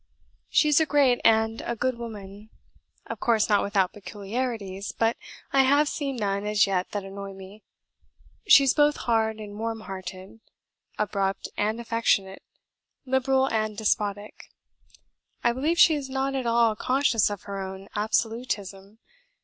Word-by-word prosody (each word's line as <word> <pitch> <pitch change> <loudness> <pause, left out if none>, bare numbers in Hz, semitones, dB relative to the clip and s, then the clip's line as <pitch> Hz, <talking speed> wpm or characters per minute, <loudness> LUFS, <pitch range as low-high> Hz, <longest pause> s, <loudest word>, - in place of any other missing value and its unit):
She 300 - +3
is 295 - +5
a 320 - +2
great 275 -5 +3
and 220 0 +3
a 235 - -3
good 255 +2 -1
woman; 210 -3 -9 0.6
of - - -7
course 225 -3 +2
not 205 - +4
without 200 -2 0
peculiarities, 205 -1 -5
but 225 +1 +1 0.4
I 270 - +6
have 285 +3 +4
seen 280 -3 -3
none 200 -3 -2
as 210 +1 +3
yet 190 -2 -1
that 205 -1 -4
annoy 195 0 -8
me. 195 +2 -12 0.9
She 280 - +8
is 270 - +3
both 295 0 +3
hard 220 -2 +1
and 210 -1 -9
warm 225 0 -3
hearted, 190 +1 -9 0.6
abrupt 195 -2 -2
and 215 +2 -1
affectionate, 230 -4 0 0.6
liberal 265 0 +2
and 215 -1 -1
despotic. 210 -1 -2 0.9
I 240 - +4
believe 300 +7 0
she 345 -2 +7
is 285 -3 -4
not 270 +1 -1
at 260 -3 -2
all 230 -1 +3
conscious 255 -2 +2
of 205 -2 -6
her 200 -1 -5
own 190 +1 -7
absolutism. 215 -2 -2
220 Hz, 150 wpm, -26 LUFS, 200-255 Hz, 0.9 s, She